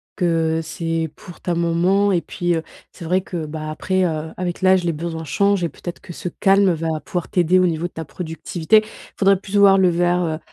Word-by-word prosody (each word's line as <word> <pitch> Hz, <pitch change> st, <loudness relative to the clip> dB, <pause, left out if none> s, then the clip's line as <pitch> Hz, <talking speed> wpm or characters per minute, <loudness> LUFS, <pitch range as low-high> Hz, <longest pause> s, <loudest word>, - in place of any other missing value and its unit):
que 165 Hz, -3 st, +1 dB
c'est 165 Hz, -1 st, -3 dB
pour 175 Hz, -, -13 dB
ta 175 Hz, -, -2 dB
maman 175 Hz, +4 st, +2 dB
et 175 Hz, -2 st, +2 dB
puis, 175 Hz, -1 st, -2 dB
heu, 160 Hz, -, -2 dB, 0.3 s
c'est 170 Hz, -, -10 dB
vrai 185 Hz, +3 st, +1 dB
que, 170 Hz, -4 st, -5 dB
bah, 155 Hz, 0 st, -6 dB
après, 185 Hz, +4 st, 0 dB
heu, 160 Hz, -1 st, -3 dB
avec 180 Hz, 0 st, -4 dB
l'âge, 185 Hz, -1 st, +4 dB
les 170 Hz, -, +1 dB
besoins 165 Hz, +1 st, -5 dB
changent 200 Hz, +4 st, +1 dB
et 170 Hz, -, 0 dB
peut-être 175 Hz, +2 st, -8 dB
que 175 Hz, -, -10 dB
ce 180 Hz, -, -5 dB
calme 195 Hz, +1 st, +3 dB
va 160 Hz, -1 st, -2 dB
pouvoir 175 Hz, -2 st, -3 dB
t'aider 180 Hz, +1 st, +3 dB
au 185 Hz, -, +4 dB
niveau 165 Hz, -1 st, -2 dB
de 175 Hz, -, -4 dB
ta 160 Hz, -, -6 dB
productivité. 170 Hz, +5 st, 0 dB, 0.4 s
Faudrait 195 Hz, -1 st, +4 dB
plus 200 Hz, +1 st, -7 dB
voir 200 Hz, -1 st, +7 dB
le 185 Hz, -1 st, +4 dB
verre, 175 Hz, +1 st, +1 dB
heu, 160 Hz, -1 st, -2 dB
175 Hz, 215 wpm, -21 LUFS, 160-185 Hz, 0.4 s, voir